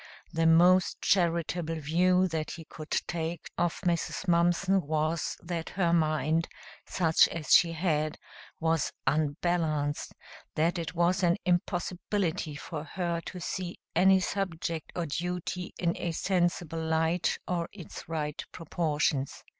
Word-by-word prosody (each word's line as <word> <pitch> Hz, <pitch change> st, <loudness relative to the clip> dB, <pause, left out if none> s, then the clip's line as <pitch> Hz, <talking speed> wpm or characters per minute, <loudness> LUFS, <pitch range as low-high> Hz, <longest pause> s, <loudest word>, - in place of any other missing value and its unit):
The 165 Hz, 0 st, +2 dB
most 180 Hz, +3 st, +5 dB
charitable 170 Hz, -2 st, +1 dB
view 180 Hz, +5 st, +3 dB
that 160 Hz, -2 st, -2 dB
he 165 Hz, -2 st, -9 dB
could 155 Hz, 0 st, -10 dB
take 165 Hz, -1 st, -3 dB
of 175 Hz, -1 st, 0 dB
Mrs. 175 Hz, +1 st, -1 dB
Mumpson 175 Hz, +3 st, +3 dB
was 155 Hz, +1 st, -1 dB
that 170 Hz, -1 st, -4 dB
her 170 Hz, -3 st, +3 dB
mind 155 Hz, 0 st, +2 dB, 0.4 s
such 160 Hz, -3 st, +4 dB
as 160 Hz, -3 st, -1 dB
she 170 Hz, -1 st, +6 dB
had 155 Hz, -2 st, 0 dB, 0.4 s
was 160 Hz, -2 st, +1 dB
unbalanced, 155 Hz, +1 st, 0 dB, 0.4 s
that 170 Hz, +3 st, +1 dB
it 165 Hz, +1 st, -5 dB
was 175 Hz, +3 st, +2 dB
an 175 Hz, -1 st, +3 dB
impossibility 175 Hz, -2 st, -1 dB
for 150 Hz, +1 st, -6 dB
her 170 Hz, +1 st, -2 dB
to 185 Hz, -, -6 dB
see 180 Hz, 0 st, -4 dB, 0.2 s
any 190 Hz, +2 st, +6 dB
subject 170 Hz, -4 st, -3 dB
or 175 Hz, -, -1 dB
duty 180 Hz, +3 st, -3 dB
in 170 Hz, -1 st, 0 dB
a 170 Hz, -, -3 dB
sensible 175 Hz, -2 st, 0 dB
light 160 Hz, +2 st, +1 dB
or 170 Hz, -2 st, -1 dB
its 180 Hz, -5 st, -10 dB
right 150 Hz, -2 st, -3 dB
proportions. 150 Hz, -5 st, -1 dB
170 Hz, 130 wpm, -29 LUFS, 160-180 Hz, 0.4 s, she